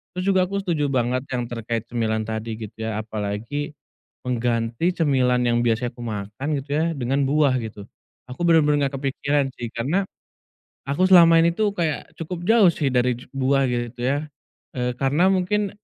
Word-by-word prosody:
Terus 180 - -2
juga 190 -2 +4
aku 200 +2 -2
setuju 160 -6 0
banget 125 0 0
yang 120 -2 -2
terkait 115 -1 -4
cemilan 110 -2 -1
tadi 110 0 -4
gitu 110 0 -7
ya, 110 -1 -2
apalagi 110 +7 -4 0.6
mengganti 120 +5 0
cemilan 130 -6 +2
yang 120 0 +2
biasanya 120 +1 +1
aku 120 - -8
makan 105 +3 -5
gitu 140 +1 -10
ya, 165 +2 +1
dengan 135 +2 0
buah 145 -2 +3
gitu. 110 -3 -8 0.5
Aku 130 - -5
bener-bener 150 -3 +4
nggak 135 - -6
kepikiran 140 +1 0
sih, 120 -1 -5
karena 150 +12 0 0.9
aku 180 +7 +2
selama 170 -3 +7
ini 170 +1 +3
tuh 210 -2 +1
kayak 160 -4 -2
cukup 175 +1 -5
jauh 225 -4 +6
sih 145 -3 -1
dari 125 -1 +2
ju 125 - -12
buah 135 +1 +2
gitu 120 0 -3
ya. 145 +4 0 0.5
Eee, 125 0 -1
karena 145 +8 +2
mungkin 195 +2 0
130 Hz, 170 wpm, -23 LUFS, 120-160 Hz, 0.9 s, selama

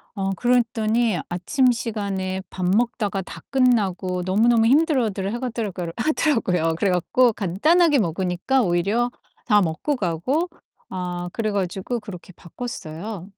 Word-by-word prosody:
어 195 -1 -1
그랬더니 230 -4 +1
아침 250 +9 +2
시간에 200 -5 -3
밥 185 -1 -4
먹다가 205 -1 +1
다 - - -10
끝나고 195 -8 +1
너무너무 225 +5 +3
힘들어들 240 - +2
하가더라가를 215 -9 -4
하더라고요. 225 - +1
그래 200 - +1
갖고 235 +7 +3
간단하게 290 - +3
먹으니까 185 +8 0
오히려 200 +7 +1 0.3
다 210 -3 +4
먹고 175 - -1
가고 230 - -1 0.4
아 175 -1 -4
그래 215 -2 -2
가지고 195 +4 -2
그렇게 185 -3 -10
바꿨어요. 185 -2 -7
205 Hz, 315 characters per minute, -23 LUFS, 180-240 Hz, 0.4 s, 다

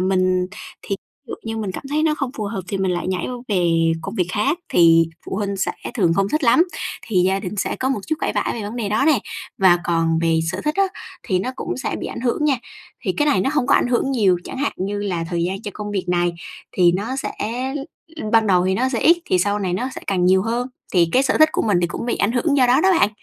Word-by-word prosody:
mình 185 -1 +2 0.4
thì 200 - -3 0.3
dụ - - -3
như 225 0 -4
mình 210 -4 -3
cảm - - -6
thấy 305 +1 +1
nó 310 -1 +2
không 275 -4 -3
phù 215 - -3
hợp 200 -1 -3
thì 195 - -2
mình 190 -1 +1
lại 175 +1 -2
nhảy 185 -1 -1
qua 250 - -4
về 165 -4 +2
công 195 +6 -5
việc 180 -5 0
khác, 215 +11 +1
thì 165 -1 +5 0.2
phụ - - -4
huynh 200 -1 -2
sẽ 190 - -1 0.2
thường 175 -7 +2
không 195 +1 +1
thích 305 +3 0
lắm, 290 +9 +5 0.4
thì 215 - -3
gia 190 +2 +1
đình 200 +2 -5
sẽ - - -1
có 260 - -1
một 270 - 0
chút 315 - 0
cãi - - 0
vã - - +1
về 230 - -5
vấn 210 +4 -6
đề 225 -4 -2
đó 215 +6 +1
nè. 300 -7 +5 0.4
Và 180 -2 +5
còn 165 -1 +1
về 165 -1 +2
sở 185 - -4
thích 300 - 0
á 390 - +4 0.4
thì 185 -5 0
nó 195 +8 -2
cũng - - -4
sẽ 265 - -3
bị - - -4
ảnh - - -6
hưởng 255 +4 0
nha, 285 -3 +3 0.5
thì - - +1
cái 295 - +2
này 200 -11 +3
nó 270 - +1
hông 290 -5 +1
có 280 - +4
ảnh - - +3
hưởng 245 +2 +1
nhiều, 205 -9 +3
chẳng - - -7
hạn 285 - 0
như 200 +2 -3
là 185 -5 -2
thời 170 -1 0
gian 195 +4 -3
cho 205 - -5
công 210 -1 -5
việc 195 -3 -2
này 175 0 +1 0.4
thì 175 -2 +4
nó 220 +8 -2
sẽ 270 - -3 0.8
l 310 - -6
ban 225 -1 +5
đầu 180 -2 +3
thì 190 - +1
nó 255 +6 +1
sẽ 245 -3 -2
ít 335 +2 +6
thì 185 - +1
sau 205 +3 +1
này 185 -3 -2
nó 240 +8 -1
sẽ - - -7
càng 185 -2 +1
nhiều 190 +1 +4
hơn, 240 +3 -2 0.2
thì 170 -3 +4
cái 260 - +4
sở 275 - +1
thích 310 - +7
của - - 0
mình 205 -5 +2
thì 175 - +2
cũng 175 - -5
bị - - 0
ảnh 205 - +1
hưởng 280 +4 +1
do 255 - +5
đó 255 +4 +4
đó 380 - +4
bạn. 205 - +5
205 Hz, 280 wpm, -21 LUFS, 180-250 Hz, 0.8 s, thích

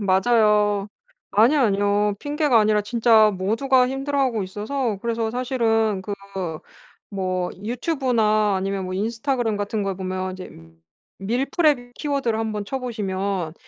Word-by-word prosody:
맞아요. 210 0 +2 0.4
아니요, 240 +8 +4
아니요. 205 -1 +2
핑계가 290 -4 +2
아니라 210 0 +3
진짜 225 -1 +4
모두가 250 +7 +2
힘들어하고 270 -4 -1
있어서 215 +3 -3
그래서 230 -1 -1
사실은 225 -5 0
그 205 - -5 1.0
뭐 185 -2 -2 0.2
유튜브나 230 -5 +1
아니면 195 0 -2
뭐 185 - -5
인스타그램 225 +2 -1
같은 205 +1 -2
걸 195 -1 -2
보면 185 0 -3
이제 185 0 -9 0.7
밀프렙 245 - 0
키워드를 275 -7 -1
한번 215 -2 -3
쳐 270 - -3
보시면 195 -7 -3
220 Hz, 305 characters per minute, -23 LUFS, 200-250 Hz, 1.0 s, 아니요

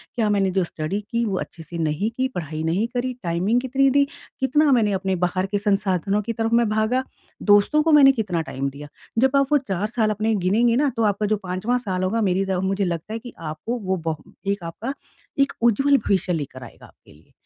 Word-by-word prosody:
क्या 220 -3 +1
मैंने 195 -2 +2
जो 190 - +4
स्टडी 165 +4 -3
की 235 0 +1
वो 195 -4 -1
अच्छे 165 - -8
से 170 +2 -8
नहीं 160 +6 0
की, 260 0 +1
पढ़ाई 160 - -5
नहीं 180 +8 0
करी 250 +1 -1
टाइमिंग 185 +8 +1
कितनी 270 +1 +2
दी, 280 +2 +4 0.4
कितना 285 +3 +3
मैंने 225 -5 +3
अपने 190 0 -1
बाहर 180 +1 +1
के 205 - +1
संसाधनों 200 -1 0
की 230 +3 -4
तरफ 225 0 -1
मैं 235 0 +4
भागा, 220 +4 +1 0.4
दोस्तों 205 +9 +4
को 325 - +2
मैंने 270 -1 +8
कितना 180 -6 -1
टाइम 135 +1 -2
दिया। 145 +2 -10 0.3
जब 265 +3 +3
आप 275 -1 +4
वो 295 - +6
4 210 -7 -2
साल 225 -2 +1
अपने 215 +1 0
गिनेंगे 230 +6 +3
ना 285 +3 +2
तो 230 - +2
आपका 205 +2 -3
जो 215 0 +1
5वाँ 190 +7 0
साल 190 -6 -3
होगा 215 +5 0
मेरी 190 +2 +1
द 190 -1 -1
मुझे 195 +1 0
लगता 170 +4 -4
है 225 - -3
कि 245 +1 -11
आपको 165 +9 -4
वो 190 -3 -1
ब 160 - +1 0.3
एक 200 -2 -1
आपका 210 +11 -5 0.5
एक 275 0 +3
उज्ज्वल 275 +5 +4
भविष्य 190 -6 0
लेकर 135 -5 -5
आएगा 120 - -13
आपके - - -21
लिए। 75 +2 -22
205 Hz, 220 wpm, -23 LUFS, 180-235 Hz, 0.5 s, मैंने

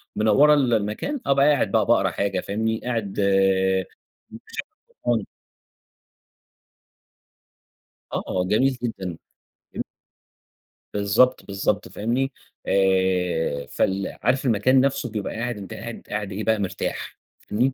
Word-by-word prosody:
منوّرة 125 +8 +5
المكان 120 - 0
أبقى 140 0 +4
قاعد 140 -9 +2
بقى 110 -1 +3
باقرا 100 -4 +3
حاجة 100 -2 -1
فاهمني، 110 +3 -1
قاعد 115 -6 -2
آآ، 95 -1 +3 0.5
مشغّل 110 - -12 0.6
قرآن. 115 -4 +1 2.9
آه، 90 - -1
جميل 130 +5 +2
جدًا، 95 -8 -4 0.6
جمي - - -3 1.1
بالضبط، 105 +6 +3
بالضبط، 100 +1 -1
فاهمني؟ 125 +6 -1 0.4
آآ، 90 -6 +1
فال 95 +1 -1
عارف 130 +4 +2
المكان 125 +3 +4
نفْسه 135 -2 0
بيبقى 105 -2 -4
قاعد، 120 0 -3
أنتَ 100 -2 -8
قاعد 115 0 -7
قاعد 105 -1 -3
إيه 100 +3 -4
بقى 110 -1 +2
مرتاح، 95 -1 -4 0.2
فاهمني؟ 125 +6 0
105 Hz, 110 wpm, -24 LUFS, 95-120 Hz, 2.9 s, منوّرة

